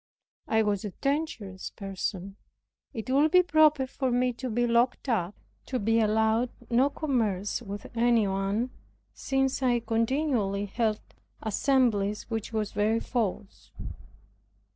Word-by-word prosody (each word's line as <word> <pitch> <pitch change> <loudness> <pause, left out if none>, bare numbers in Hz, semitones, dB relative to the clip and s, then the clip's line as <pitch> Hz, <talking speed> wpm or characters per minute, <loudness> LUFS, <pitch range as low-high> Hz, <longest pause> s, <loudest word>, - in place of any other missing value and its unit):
I 220 0 +3
was 205 -2 0
a 210 - -3
dangerous 275 -10 -2
person, 195 -1 -5 0.6
it 225 +2 -5
would 290 +4 +4
be 360 +2 +6
proper 310 -4 +4
for 260 0 -2
me 250 0 +1
to 255 +2 -5
be 240 +2 +1
locked 240 +3 +1
up, 205 -6 0 0.3
to 260 - -1
be 225 +1 +2
allowed 220 +2 +2 0.2
no 255 +4 +4
commerce 225 -10 -1
with 205 -2 -7
any 235 -2 +3
one; 195 +6 -1 0.4
since 270 0 -1
I 245 -2 +2
continually 230 -3 0
held 215 +1 -1 0.4
assemblies, 220 -3 +1
which 225 -1 -3
was 215 -2 -2
very 220 +2 +1
false. 215 -5 -3
230 Hz, 130 wpm, -28 LUFS, 205-255 Hz, 0.6 s, be